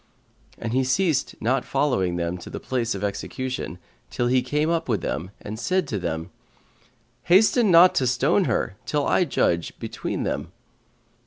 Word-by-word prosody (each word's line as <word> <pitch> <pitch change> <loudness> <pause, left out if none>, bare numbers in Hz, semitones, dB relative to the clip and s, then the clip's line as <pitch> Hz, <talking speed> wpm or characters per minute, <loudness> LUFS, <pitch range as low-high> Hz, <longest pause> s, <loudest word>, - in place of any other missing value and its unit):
And 115 0 -4
he 130 +1 +2
ceased 140 +1 +1
not 125 +3 +1
following 125 -11 0
them 85 +1 -2
to - - -10
the - - -6
place 120 -4 -2
of 100 - -5
execution, 115 +1 -4 0.3
till 120 - -1
he 125 +1 +3
came 150 +5 0
up 165 -5 -1
with 110 -4 +1
them 85 +5 -3
and 110 +1 -6
said 185 +9 0
to 105 - -2
them, 80 -2 -4 0.9
"Hasten 215 +5 +5
not 175 +1 +7
to 130 - +1
stone 140 +10 +2
her, 95 - -1
till 145 -1 0
I 180 - +3
judge 85 - 0
between - - -4
them." - - -3
130 Hz, 165 wpm, -24 LUFS, 100-155 Hz, 0.9 s, not